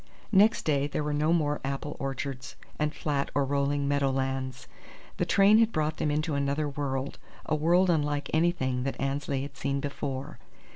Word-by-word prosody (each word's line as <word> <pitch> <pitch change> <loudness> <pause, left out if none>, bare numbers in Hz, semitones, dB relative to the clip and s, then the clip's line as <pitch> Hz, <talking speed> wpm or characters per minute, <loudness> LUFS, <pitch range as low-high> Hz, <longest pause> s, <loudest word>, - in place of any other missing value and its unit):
Next 210 +2 +5
day 145 -2 +2
there 150 +1 -2
were 150 0 -1
no 150 +2 +2
more 150 -3 +1
apple 140 +2 -3
orchards 135 -1 -4 0.2
and 150 0 +1
flat 145 -3 -2
or 140 - +3
rolling 140 +1 0
meadow 140 -1 +2
lands. 130 -1 -2 0.5
The - - 0
train 200 +2 +6
had 230 0 +4
brought 155 -2 -1
them 150 - 0
into 155 +1 0
another 140 +2 0
world, 140 -1 -3 0.3
a - - -1
world 175 +4 +3
unlike 145 -3 0
anything 155 -6 +1
that 135 +2 -3
Annesley 135 0 -1
had 140 -1 -8
seen 140 +1 -1
before. 140 0 -4
145 Hz, 175 wpm, -28 LUFS, 135-155 Hz, 0.5 s, train